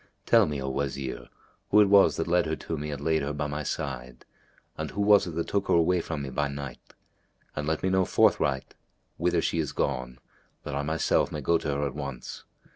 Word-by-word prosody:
Tell - - +5
me, 75 -2 -3
O 65 - -4
Wazir, 65 0 -3 0.4
who 105 - +5
it 105 - +7
was 100 0 +5
that - - -1
led 85 -1 +2
her 80 - -1
to 80 - -5
me 75 0 -4
and 70 -1 -5
laid 80 0 +2
her 70 +1 -2
by 75 0 -2
my 75 +1 -3
side, 65 -4 -5 0.5
and - - -4
who 100 - -7
was 100 -2 +5
it 85 - -6
that 85 - -2
took 100 -1 0
her - - +3
away 85 +1 +3
from 80 -3 -4
me 65 - -5
by 75 +3 0
night; 70 -3 -8 0.6
and 75 0 -3
let 80 0 -1
me 95 - +2
know 95 0 +3
forthright 65 -5 +2 0.4
whither - - +1
she 85 - 0
is 75 -3 -2
gone, 65 0 -2 0.5
that - - -5
I 70 - -1
myself 80 +2 +1
may 75 - -4
go 85 +4 +2
to - - -5
her 70 0 0
at 70 - -3
once. 70 -4 -7
75 Hz, 225 wpm, -27 LUFS, 70-85 Hz, 0.6 s, it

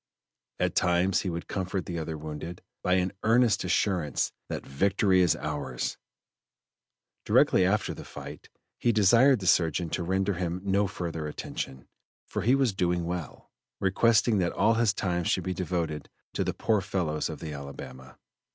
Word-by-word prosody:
At - - +1
times 90 +1 +2
he 95 - -2
would 85 0 -5
comfort 95 -1 -3
the 85 -2 -4
other 80 0 -4
wounded 80 +3 -7 0.2
by 90 - +1
an 95 0 +2
earnest 115 -2 +3
assurance 90 -4 0 0.2
that - - -4
"victory 95 +6 +2
is 85 -4 +4
ours!" 75 -2 -4 1.2
Directly 90 - +4
after 105 +2 0
the - - -9
fight 70 +1 -10 0.3
he 120 - +3
desired 115 +4 +5
the - - -4
surgeon 85 -1 +2
to - - -1
render 95 +3 0
him 90 0 -2
no 100 +1 +2
further 85 -4 -4
attention, 65 -3 -6 0.4
for - - -3
he 120 +7 +4
was 135 -6 +2
"doing 90 -2 0
well," 85 -4 -6 0.3
requesting 105 +2 +3
that 90 -2 0
all 115 - +3
his 115 -2 +3
time 90 -3 -1
should 90 +2 0
be 95 - -2
devoted 85 -5 -3 0.2
to - - 0
the - - -2
"poor 110 -3 +1
fellows 90 -5 -1
of - - -6
the 80 -2 -6
Alabama." 65 -2 -9
90 Hz, 160 wpm, -28 LUFS, 80-100 Hz, 1.2 s, desired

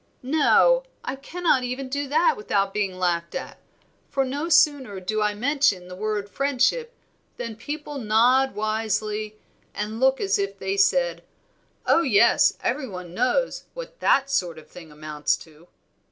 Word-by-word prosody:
"No, 315 - +4 0.2
I - - -4
cannot 300 -1 0
even 255 +2 -4
do 285 +2 -3
that 315 +2 +3
without 200 -2 -1
being 195 -3 -2
laughed 170 -2 -1
at; - - -6 0.5
for 275 -1 0
no 285 +6 -3
sooner 275 - +3
do 215 +4 -2
I 210 0 +1
mention 245 -6 +1
the 180 - -8
word 210 +1 -3
friendship 280 - 0 0.4
than 230 -2 -5
people 290 +4 -6
nod 245 +4 +3
wisely 215 0 -2 0.4
and 215 +2 -4
look 265 +1 +3
as 195 0 +1
if 195 0 -3
they 190 0 -2
said, 175 -4 +2 0.6
'Oh, 335 - +4
yes, 235 -6 +4
every 265 +2 -1
one 180 -3 -8
knows 255 - 0
what - - -9
that 275 0 +2
sort 175 -11 0
of 155 - -13
thing 165 -3 -13
amounts 150 0 -2
to.' 160 +1 -17
220 Hz, 155 wpm, -24 LUFS, 195-275 Hz, 0.6 s, No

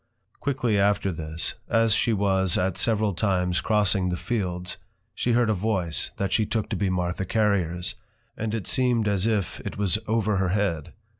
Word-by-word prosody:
Quickly 125 -7 0
after 100 -1 +2
this, 80 -1 -3 0.2
as 115 -1 +3
she 115 - +2
was 95 -3 +2
at 90 -1 0
several 110 -3 +1
times 90 -2 0
crossing 100 -3 +2
the 90 - -2
Fields, 90 -5 -3 0.4
she 120 - 0
heard 120 -1 +3
a - - +2
voice, 95 -4 0
that 100 -1 -1
she 110 - +3
took 110 0 -2
to - - -2
be 100 -2 0
Martha 90 0 -1
Carriers, 95 -4 0 0.4
and 110 0 -3
it 110 - -4
seem'd 120 -4 +1
as 100 0 +1
if 105 -6 -1
it - - -6
was 105 0 +1
over 110 -2 +1
her 95 -1 +1
head. 90 -6 -1
100 Hz, 175 wpm, -25 LUFS, 90-110 Hz, 0.4 s, as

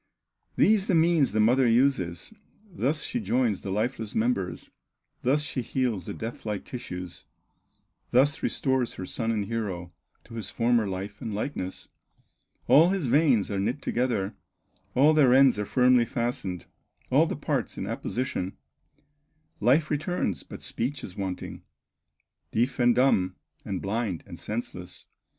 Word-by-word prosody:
These 210 -1 +4
the 190 - +3
means 165 -3 +4
the 110 - 0
mother 120 +4 +4
uses, 115 - +1 0.3
Thus 155 - -1
she 245 - -2
joins 125 - +1
the - - -5
lifeless 110 +2 -2
members, 110 -5 -1 0.5
Thus 145 +4 +2
she 135 -2 -3
heals 120 -6 -1
the - - -4
death 115 +1 -6
like 105 -2 -3
tissues, 90 -8 -7 0.8
Thus 145 +6 +3
restores 130 -3 0
her 95 - -5
son 115 +4 -2
and 105 -3 0
hero 95 -6 -4 0.3
To 115 - -14
his 110 -4 -4
former 115 -2 +2
life 100 +2 -5
and 110 -5 -4
likeness; 105 -5 -4 0.8
All 160 +5 +7
his 190 -5 0
veins 130 -5 +3
are 100 - -1
knit 115 +8 -1
together, 115 -6 0 0.6
All 145 +5 +6
their 135 -5 +5
ends 135 -5 +5
are 105 - -1
firmly 125 +1 +4
fastened, 115 -7 -3 0.5
All - - +5
the - - -3
parts - - -2
in - - -3
apposition, 120 -7 -3 1.0
Life 135 +8 +3
returns, 155 - -1
but - - -11
speech 130 +4 -3
is 90 - -7
wanting, 95 -2 -5 0.9
Deaf 125 +4 0
and 120 -1 +4
dumb, 95 -8 +3 0.3
and 95 -2 -3
blind, 100 -3 -2
and 85 -4 -10
senseless. 90 -5 -6
120 Hz, 145 wpm, -27 LUFS, 100-135 Hz, 1.0 s, All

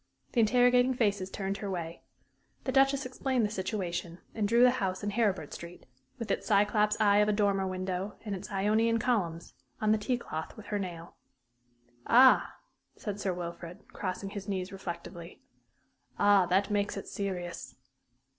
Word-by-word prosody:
The 240 - 0
interrogating 245 +3 +4
faces 205 -5 0
turned 195 0 -3
her 200 - -5
way. 170 -2 -5 0.6
The 260 - -1
Duchess 270 0 +3
explained 255 -2 0
the 210 - -3
situation, 185 -4 -3 0.2
and 215 -2 0
drew 235 +3 +4
the 250 - +7
house 185 0 -2
in 205 - -1
Heribert 210 -3 0
Street 170 +1 -10 0.3
with 225 -3 -4
its - - -2
Cyclops 210 +1 +3
eye 205 -1 +4
of 210 0 +4
a - - +4
dormer 200 -2 +1
window, 185 +1 -3
and 205 - -3
its 190 +1 -8
Ionian 215 +4 +2
columns 195 -9 -1 0.3
on 215 0 +2
the 215 - +3
tea 245 +4 0
cloth 160 -8 -6
with 215 - -10
her 205 - +1
nail. 175 -3 -7 0.9
"Ah," 255 +2 +6 0.4
said 205 -1 -5
Sir 195 - -1
Wilfrid, 170 0 -7
crossing 195 +1 -4
his 200 -1 -7
knees 185 -1 -3
reflectively. 175 -2 -8 0.7
"Ah, 205 -3 +5
that 195 +3 +1
makes 205 0 0
it - - -6
serious." 180 -4 -5
200 Hz, 165 wpm, -30 LUFS, 185-220 Hz, 0.9 s, the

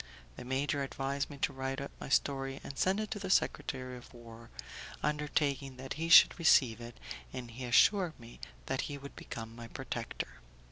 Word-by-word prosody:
The - - -8
major 135 +3 0
advised 135 +1 -2
me 145 - -9
to - - +2
write 135 +1 -3
out 140 - -5
my - - -7
story 135 -1 +1
and 140 - -7
send 190 +7 +2
it 215 -1 -3
to 205 - -3
the 195 -1 -5
secretary 130 -8 0
of 120 - -14
war, 115 -1 -12 0.5
undertaking 145 -3 0
that 130 +1 -5
he 165 +2 -3
should 170 - +9
receive 125 -8 +5
it, 120 0 -9 0.3
and 125 -2 -6
he 125 +3 -6
assured 175 - +4
me 115 0 -13 0.3
that 130 - -1
he 145 - -4
would 140 0 -10
become 115 0 -7
my 115 0 -8
protector. - - -5
135 Hz, 185 wpm, -33 LUFS, 125-145 Hz, 0.5 s, should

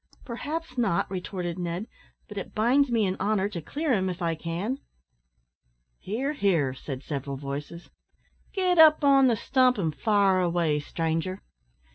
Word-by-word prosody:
"Perhaps 285 +2 -5
not," 225 -8 +1
retorted 180 -2 -4
Ned; 175 +3 -3 0.4
"but 210 - -10
it - - -9
binds 250 +6 +3
me 230 -3 +2
in 185 -1 -1
honour 205 -2 +1
to 175 -5 -5
clear 295 - -1
him, 190 -4 +1
if 180 -1 -5
I 170 -2 0
can." 170 - -3 1.2
"Hear, 260 +9 -2
hear," 170 - +1
said 135 0 -7
several 140 -2 -4
voices; 145 +5 -7 0.6
"get 365 -3 +1
up 310 -1 +7
on 275 -1 +6
the 235 - +3
stump 255 +2 +2
an' 165 -6 0
fire 195 +5 +2
away, 170 -4 +1
stranger." 165 +5 -3
190 Hz, 150 wpm, -27 LUFS, 165-250 Hz, 1.2 s, up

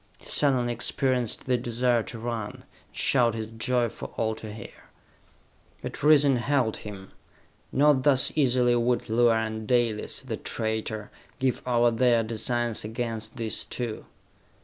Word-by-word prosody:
He - - -19
suddenly 125 -4 +2
experienced 125 0 +1
the 125 -1 +2
desire 120 0 +1
to 115 - -8
run, 115 -2 -4
and - - -16 0.3
shout 120 -4 +2
his 110 -1 -3
joy 120 +2 0
for - - -9
all 110 -1 0
to 110 -1 -8
hear. 110 - -11 1.0
But - - -6
reason 145 -3 +5
held 125 -3 0
him. 100 -2 -10 0.6
Not 145 0 +4
thus 135 -1 +4
easily 125 -4 +3
would 120 0 0
Luar 115 0 +4
and 110 0 -5
Dalis, 120 -4 0
the - - -5
traitor, 110 -1 -3 0.3
give 130 -2 0
over 120 -1 +3
their 115 0 +3
designs 115 +1 -2
against 110 0 -4
these 115 -2 -2
two. 120 -3 -5
120 Hz, 145 wpm, -26 LUFS, 110-125 Hz, 1.0 s, reason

